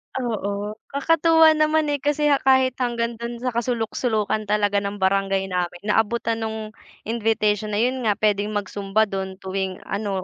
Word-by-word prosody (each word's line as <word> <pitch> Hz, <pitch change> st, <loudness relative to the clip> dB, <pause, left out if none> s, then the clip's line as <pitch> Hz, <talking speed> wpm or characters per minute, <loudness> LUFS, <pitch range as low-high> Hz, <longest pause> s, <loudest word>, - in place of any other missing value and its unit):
Oo, 210 Hz, -4 st, -2 dB, 0.2 s
kakatuwa 320 Hz, +2 st, +4 dB
naman, 310 Hz, 0 st, +2 dB
eh, 285 Hz, -, -1 dB
kasi 295 Hz, 0 st, +1 dB, 0.2 s
kahit 260 Hz, -1 st, +4 dB
hanggang 235 Hz, -2 st, -1 dB
do'n 235 Hz, 0 st, -5 dB
sa 250 Hz, -, 0 dB
kasuluk-sulukan 225 Hz, -2 st, -1 dB
talaga 205 Hz, -1 st, +2 dB
ng 200 Hz, 0 st, -4 dB
barangay 195 Hz, 0 st, +1 dB
namin, 175 Hz, -1 st, -2 dB
naabutan 225 Hz, +2 st, +1 dB
nung 220 Hz, -1 st, -4 dB, 0.3 s
invitation 215 Hz, -2 st, 0 dB
na 205 Hz, -, +1 dB
'yun 255 Hz, +1 st, 0 dB
nga 205 Hz, -, +3 dB
puwedeng 210 Hz, 0 st, 0 dB
mag-Zumba 205 Hz, +1 st, 0 dB
do'n 190 Hz, -2 st, -5 dB
tuwing 190 Hz, -1 st, -3 dB
ano 200 Hz, -3 st, -3 dB
220 Hz, 145 wpm, -23 LUFS, 200-245 Hz, 0.3 s, kakatuwa